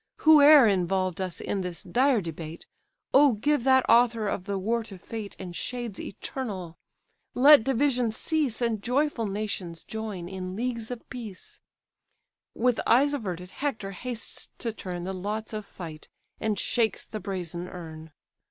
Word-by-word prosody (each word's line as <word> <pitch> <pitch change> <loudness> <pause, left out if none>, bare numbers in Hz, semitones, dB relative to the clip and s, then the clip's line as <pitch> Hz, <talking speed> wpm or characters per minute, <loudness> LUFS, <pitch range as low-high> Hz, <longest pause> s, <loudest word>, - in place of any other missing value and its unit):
Whoe'er 300 -3 +8
involved 185 -1 +1
us 185 -2 -4
in 195 - -2
this 180 -3 -6
dire 250 +5 +2
debate, 165 -1 -7 0.5
O 280 -1 +7
give 285 +5 +1
that 260 -1 +5
author 230 -2 +4
of 190 -2 -2
the 200 -1 -2
war 225 +5 0
to 210 -4 -10
fate 210 +3 -7
And 180 -2 -8
shades 240 -3 -4
eternal! 190 -7 -6 0.6
let 280 0 +8
division 250 -2 +1
cease, 265 0 -1
And 225 -3 0
joyful 250 -1 0
nations 195 -5 -4
join 215 -6 -5
in 185 0 -5
leagues 235 0 -3
of 245 -2 -7
peace." 225 -7 -8 1.0
With 245 0 +2
eyes 280 +4 +5
averted 180 -8 -4
Hector 225 -9 -3
hastes 235 +4 -5
to 230 -2 -2
turn 180 -4 -6
The 190 +2 -3
lots 210 +4 -4
of 215 -1 -5
fight 160 -4 -9 0.3
and 215 -2 -1
shakes 220 +1 0
the 215 - -6
brazen 180 -3 -5
urn. 160 -3 -9
215 Hz, 150 wpm, -27 LUFS, 185-245 Hz, 1.0 s, Whoe'er